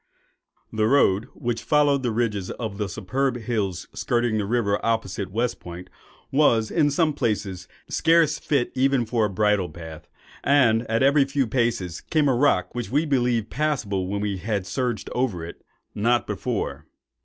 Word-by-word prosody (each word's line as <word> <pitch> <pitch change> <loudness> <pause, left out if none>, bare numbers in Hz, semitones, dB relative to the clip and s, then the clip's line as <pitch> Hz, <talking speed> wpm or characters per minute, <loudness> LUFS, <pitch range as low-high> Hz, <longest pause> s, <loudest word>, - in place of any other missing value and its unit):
The 110 0 +1
road, 115 -4 +3
which 120 -1 -3
followed 145 -2 +3
the 125 - -1
ridges 110 -4 -1
of 110 -4 -5
the 105 -2 -2
superb 125 +7 -1
hills 105 -7 -3
skirting 120 -2 0
the 105 - -1
river 105 -3 0
opposite 105 -4 -1
West 115 +5 -1
Point, 90 +1 -10 0.4
was, 120 -6 +3
in 155 -4 +3
some 155 +1 +1
places, 100 -8 -2 0.2
scarce 160 -2 +3
fit 140 -5 0
even 130 -1 +2
for 115 -1 +1
a - - -1
bridle 105 -1 +1
path; 80 -1 -10 0.4
and, 120 -5 +3
at 115 +3 +2
every 140 +1 +5
few 135 0 0
paces, 115 -8 -1
came 155 -2 +1
a 135 - +3
rock, 120 -9 +2
which 120 -1 -4
we 150 +5 +1
believed 120 -6 0
passable 120 -11 -1
when 100 +1 -2
we 100 -2 -2
had 100 0 -2
surged 115 +3 -2
over 110 -10 -1
it—not 115 +7 -3
before. - - -3
115 Hz, 160 wpm, -24 LUFS, 100-135 Hz, 0.4 s, every